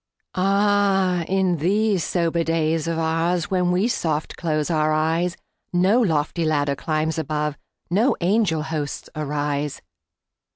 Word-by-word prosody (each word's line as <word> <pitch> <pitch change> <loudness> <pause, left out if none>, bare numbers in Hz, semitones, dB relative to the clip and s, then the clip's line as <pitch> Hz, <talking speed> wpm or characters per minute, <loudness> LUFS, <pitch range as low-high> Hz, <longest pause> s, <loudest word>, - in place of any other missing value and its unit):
Ah, 195 -1 +2
in 190 -2 +1
these 195 +3 +1
sober 170 -1 0
days 165 -1 0
of 165 -1 -1
oursWhen 170 +3 0
we 185 +5 +2
soft 160 -9 -2
close 155 -1 -1
our 155 -1 +2
eyes, 165 +3 0 0.3
No 185 +6 +3
lofty 165 -4 0
ladder 145 -3 +1
climbs 155 +2 -1
above, 150 -2 -2 0.4
No 220 +9 +3
angel 180 -4 +1
hosts 155 -2 -4
arise. 145 -1 -2
165 Hz, 120 wpm, -22 LUFS, 155-185 Hz, 0.4 s, No